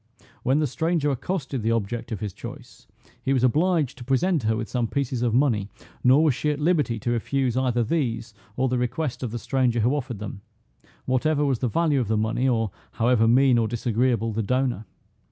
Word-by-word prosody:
When 130 +3 +2
the 155 - +2
stranger 155 +2 0
accosted 140 -2 -3
the 110 - 0
object 115 +1 -3
of 105 - -4
his 105 -3 -4
choice, 120 +4 -11 0.3
he 135 +3 0
was 130 -2 +1
obliged 155 +1 +2
to - - -7
present 135 +6 +1
her 110 0 0
with 110 -1 -3
some 120 -2 -1
pieces 130 -1 -2
of 120 -2 +1
money, 115 -7 +2 0.3
nor 130 +5 +5
was 155 -4 +4
she 150 - -1
at 150 - 0
liberty 150 -7 +1
to 120 +3 -2
refuse 125 +1 0
either 125 -2 +1
these, 115 -5 -2 0.2
or 130 +1 +2
the 125 -1 0
request 125 +3 -2
of 125 - -2
the 120 - -4
stranger 125 -2 0
who 120 +5 +2
offered 130 -5 -4
them, 100 -1 -7 0.6
whatever 145 +3 +1
was 135 -4 0
the 130 - 0
value 155 +1 +1
of 120 - -2
the 110 +1 +1
money, 115 +4 0
or 115 -4 0 0.2
however 115 -1 +3
mean 125 +1 +5
or 115 - +1
disagreeable 120 0 0
the 115 - -1
donor. 125 -1 -1
125 Hz, 205 wpm, -25 LUFS, 115-140 Hz, 0.6 s, nor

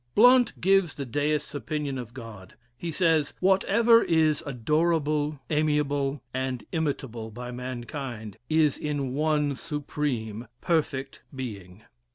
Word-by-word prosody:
Blount 245 +2 +6
gives 190 -3 +3
the 140 - -4
Deist's 145 +3 -1
opinion 145 0 -3
of 120 -2 -7
God. 115 -7 -10 0.2
He 165 +7 -5
says, 160 -3 +2
"Whatever 210 +5 +5
is 160 -4 +2
adorable, 150 +2 +1
amiable, 145 -3 +1
and 130 -1 -2
imitable 135 -8 -2
by 125 +3 -7
mankind, 125 -3 -6
is 155 -2 +3
in 145 -4 -2
one 150 -1 +1
Supreme, 135 -7 -3
perfect 140 -5 -1
Being." 105 -6 -7
145 Hz, 115 wpm, -27 LUFS, 125-155 Hz, 0.2 s, Blount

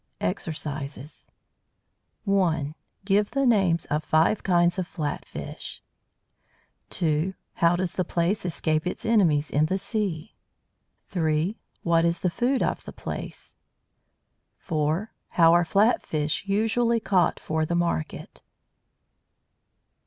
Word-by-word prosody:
EXERCISES 145 - -4 1.0
1. 170 -8 +1 0.3
Give 205 +1 +3
the 275 0 0
names 195 -8 +3
of 150 +1 -1
five 160 +8 +3
kinds 175 0 +3
of 180 - -2
flat 150 -5 -3
fish. - - -7 1.1
2. 165 +3 0 0.2
How 170 +1 +4
does 180 -1 -1
the 185 - 0
Plaice 175 +4 0
escape 155 -2 0
its 180 - -4
enemies 170 -10 +3
in 150 +2 +3
the 190 - 0
sea? 195 -6 -3 0.8
3. 165 +2 0 0.2
What 165 -1 +3
is 170 0 +1
the 180 - +1
food 250 +7 +1
of - - -1
the - - -7
Plaice? - - -7 1.0
4. 160 +5 -1 0.2
How 165 -1 +6
are 175 0 +5
flat 205 +7 +3
fish 155 +3 -1
usually 225 +3 +2
caught 190 -5 +2
for 160 0 -1
the 170 +2 -1
market? 170 - -2
170 Hz, 120 wpm, -26 LUFS, 155-195 Hz, 1.1 s, How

